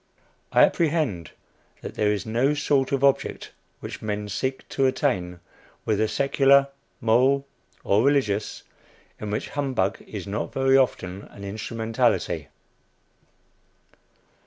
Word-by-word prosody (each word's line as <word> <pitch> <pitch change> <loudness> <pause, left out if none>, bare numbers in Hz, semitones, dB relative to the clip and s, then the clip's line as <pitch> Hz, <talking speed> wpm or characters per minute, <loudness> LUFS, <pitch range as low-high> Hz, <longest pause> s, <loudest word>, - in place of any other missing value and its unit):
I - - +6
apprehend 150 - +1 0.5
that - - -7
there 105 -1 +1
is 105 -2 -2
no 120 +6 +1
sort 140 -2 +1
of 140 -1 0
object 140 -1 +1 0.3
which - - -7
men 105 -1 -3
seek 130 +6 -3
to 135 -1 +2
attain, 90 -10 -1 0.4
whether 110 0 +1
secular, 140 +2 +3 0.3
moral 130 +5 +3 0.4
or 100 +2 +3
religious, 130 -7 0 0.6
in 105 - -5
which 105 - -3
humbug 130 -10 -1
is 100 -4 -6
not 100 +2 -3
very 135 0 +3
often 100 -8 0
an 100 - -12
instrumentality. 110 +2 -1
115 Hz, 115 wpm, -25 LUFS, 105-140 Hz, 0.6 s, I